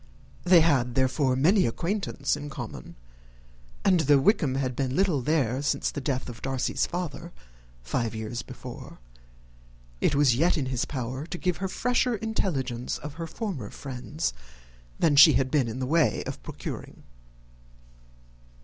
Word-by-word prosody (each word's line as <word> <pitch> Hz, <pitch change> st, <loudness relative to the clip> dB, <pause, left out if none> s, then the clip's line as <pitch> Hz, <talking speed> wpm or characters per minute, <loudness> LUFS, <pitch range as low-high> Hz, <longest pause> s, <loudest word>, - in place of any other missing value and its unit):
They 175 Hz, -1 st, +6 dB
had, 130 Hz, -7 st, +2 dB
therefore, 130 Hz, 0 st, +2 dB
many 175 Hz, -, +4 dB
acquaintance 170 Hz, -, -1 dB
in 145 Hz, 0 st, -7 dB
common; 135 Hz, -, -8 dB, 0.9 s
and, 180 Hz, -, +5 dB
though 145 Hz, -2 st, +5 dB
Wickham 140 Hz, -3 st, +2 dB
had 130 Hz, -2 st, -1 dB
been 130 Hz, -1 st, -1 dB
little 180 Hz, -7 st, +2 dB
there 135 Hz, -3 st, +1 dB
since 145 Hz, -, 0 dB
the 145 Hz, -, -5 dB
death 130 Hz, -1 st, -2 dB
of 120 Hz, -2 st, -9 dB
Darcy's 135 Hz, -1 st, -1 dB
father, 175 Hz, -4 st, -5 dB, 0.5 s
five 115 Hz, -, -2 dB
years 110 Hz, +2 st, -4 dB
before, -, -, -10 dB, 1.0 s
it 140 Hz, -, +2 dB
was 140 Hz, -4 st, +4 dB
yet 165 Hz, +7 st, +2 dB
in 140 Hz, -, -1 dB
his 130 Hz, -2 st, -1 dB
power 130 Hz, +2 st, -4 dB
to 175 Hz, -, -5 dB
give 180 Hz, -1 st, -1 dB
her 195 Hz, -, -2 dB
fresher 245 Hz, +4 st, +1 dB
intelligence 150 Hz, -, -2 dB
of 150 Hz, 0 st, -8 dB
her 165 Hz, -, -3 dB
former 160 Hz, -, -5 dB
friends 140 Hz, +4 st, -4 dB, 0.6 s
than 155 Hz, -3 st, +3 dB
she 150 Hz, +2 st, +9 dB
had 130 Hz, +1 st, +1 dB
been 140 Hz, -5 st, +2 dB
in 115 Hz, +2 st, -5 dB
the 130 Hz, -, -2 dB
way 160 Hz, +3 st, +2 dB
of -, -, -6 dB
procuring. -, -, -8 dB
140 Hz, 150 wpm, -27 LUFS, 130-170 Hz, 1.0 s, she